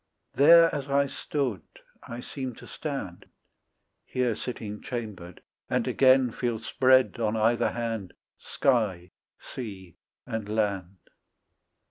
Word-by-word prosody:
There 165 +4 +7
as 145 -2 -4
I 140 0 +3
stood 135 - -3 0.4
I 120 +1 -8
seem 130 -2 -6
to - - -13
stand, 135 - -6 0.8
Here 125 -2 0
sitting 105 -2 -6
chambered, 105 -9 -6 0.3
and - - 0
again 130 -2 +4
Feel 120 0 -2
spread 130 +2 +3
on 110 -1 0
either 115 +2 +2
hand 115 -6 -4 0.3
Sky, 100 -9 0 0.3
sea, 95 -8 -9 0.3
and 110 -2 -4
land. 100 -4 -1
115 Hz, 110 wpm, -27 LUFS, 105-130 Hz, 0.8 s, There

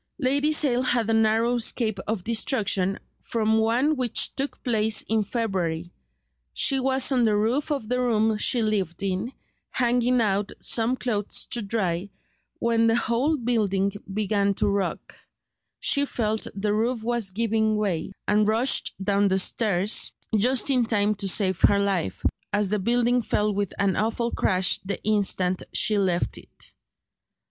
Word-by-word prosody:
Lady 285 +2 +1
Sale 275 -5 +2
had 245 -3 +1
a - - +2
narrow 225 +2 +2
escape 220 -3 -1
of 210 -4 -2
destruction 205 -4 0 0.2
from 220 -1 0
one 245 +7 +2
which 250 -4 -1
took 275 +1 -4
place 220 -3 +1
in 220 0 0
February. 185 -7 -3 0.6
She 270 - +2
was 265 +1 +1
on 250 -2 +2
the 215 -2 +2
roof 230 +9 0
of 275 -7 -2
the 250 +2 -1
room 220 -3 +1
she 240 +1 +2
lived 195 -5 -2
in, 195 +5 -2 0.4
hanging 245 0 +1
out 205 -2 0
some 235 +2 +1
clothes 215 -5 -1
to 240 - +1
dry, 195 -3 -2 0.5
when 230 -1 +1
the 225 - +3
whole 240 +7 +1
building 210 -6 0 0.2
began 200 -1 0
to - - 0
rock; 200 -1 -2 0.7
she 285 0 +2
felt 220 -3 -2
the 205 +1 -1
roof 225 +2 -1
was 235 -3 0
giving 220 +1 0
way, 195 -5 -2 0.2
and 210 0 +3
rushed 230 +5 +1
down 200 0 +2
the 190 0 +1
stairs, 200 0 +1 0.2
just 250 +5 +2
in 250 -2 +3
time 210 -2 +1
to 200 -1 -2
save 190 -2 +1
her 200 - +5
life, 195 - -1 0.3
as 205 -1 +1
the 210 - +1
building 240 +4 +1
fell 210 -1 0
with 200 -1 -2
an 195 -1 +1
awful 230 +3 -1
crash 185 -1 +1
the 190 0 -3
instant 190 -3 +1
she 210 -2 +2
left 180 -3 0
it. - - -10
220 Hz, 155 wpm, -24 LUFS, 200-240 Hz, 0.7 s, her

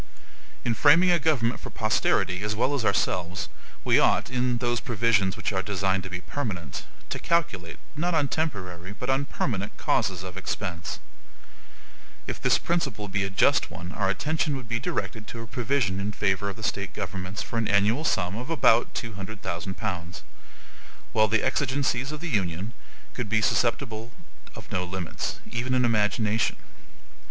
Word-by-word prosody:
In 120 - +2
framing 165 - +6
a 175 - +4
government 130 -6 +2
for - - -7
posterity 105 -4 +1
as 105 +1 -1
well 125 +6 +2
as 140 -5 0
ourselves, 90 -3 0 0.3
we - - +5
ought, - - +3
in 125 -1 +1
those 120 0 0
provisions 110 -5 +2
which - - -1
are 95 - +1
designed 95 -1 0
to 95 - -7
be 90 -1 -4
permanent, 90 - -4 0.2
to - - -3
calculate, 105 - 0 0.2
not 170 +3 0
on 150 -3 +3
temporary, 95 - -3
but 125 +5 -2
on 135 +1 +1
permanent 105 -8 -2
causes 90 -2 +1
of 95 0 -7
expense. 90 -3 -3 1.3
If - - -5
this - - +4
principle 135 -12 -1
be 100 0 0
a - - -2
just 95 - +3
one 85 +2 -7
our 95 -1 0
attention 150 +7 0
would 130 -3 -8
be 115 0 -1
directed 110 -3 -3
to 115 - -6
a - - -6
provision 120 -5 0
in 100 +1 -2
favor 100 0 +1
of 100 - -5
the 110 - -10
State 100 -3 -1
governments 95 0 -4
for 115 - -2
an 110 - 0
annual 105 +8 +3
sum 90 - +1
of 125 +6 -5
about 120 -7 +4
two 115 -2 -3
hundred 100 +3 -7
thousand 95 0 -3
pounds; 85 -2 -4 0.9
while 110 0 +5
the 110 0 +2
exigencies 130 -1 +1
of 150 0 -6
the 175 - -3
Union 95 - -1 0.4
could 125 -4 -3
be 110 0 +3
susceptible 115 0 +1 0.4
of - - -11
no 90 - 0
limits, 90 -1 -3
even 125 +2 0
in 125 -1 +4
imagination. 110 -1 +2
110 Hz, 170 wpm, -27 LUFS, 95-125 Hz, 1.3 s, framing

